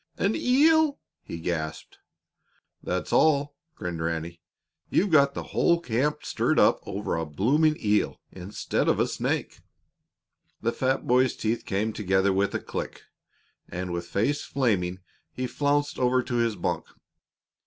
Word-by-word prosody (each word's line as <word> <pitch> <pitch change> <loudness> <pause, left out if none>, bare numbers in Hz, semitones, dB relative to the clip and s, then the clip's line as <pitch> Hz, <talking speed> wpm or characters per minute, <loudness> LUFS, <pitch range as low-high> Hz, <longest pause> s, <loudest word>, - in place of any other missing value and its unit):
"An 200 +3 +1
eel?" 300 +3 +4 0.2
he - - -7
gasped. 80 -2 -4 0.8
"That's - - -3
all," 145 -2 +3 0.2
grinned 85 -2 -5
Ranny. 85 +1 -3 0.5
"You've 195 -1 +2
got 140 -2 +5
the - - -3
whole 170 0 +3
camp 150 +1 -1
stirred - - 0
up - - +5
over 100 -1 -2
a 80 - -1
blooming 145 - +2
eel 105 0 +1
instead 95 +3 -3
of - - +2
a - - +4
snake." - - -2 1.0
The 115 - 0
fat 130 +2 -1
boy's 125 +1 +3
teeth 115 +2 -2
came 105 +3 -1
together 95 -1 +1
with 100 +1 0
a - - 0
click, - - -6 0.7
and, 90 0 -4
with 85 0 -4
face 135 +11 0
flaming, 95 -9 -1 0.3
he 130 - -3
flounced 145 +3 0
over 125 0 +2
to 120 0 -4
his 115 -2 +1
bunk. 90 - -2
115 Hz, 145 wpm, -26 LUFS, 95-145 Hz, 1.0 s, got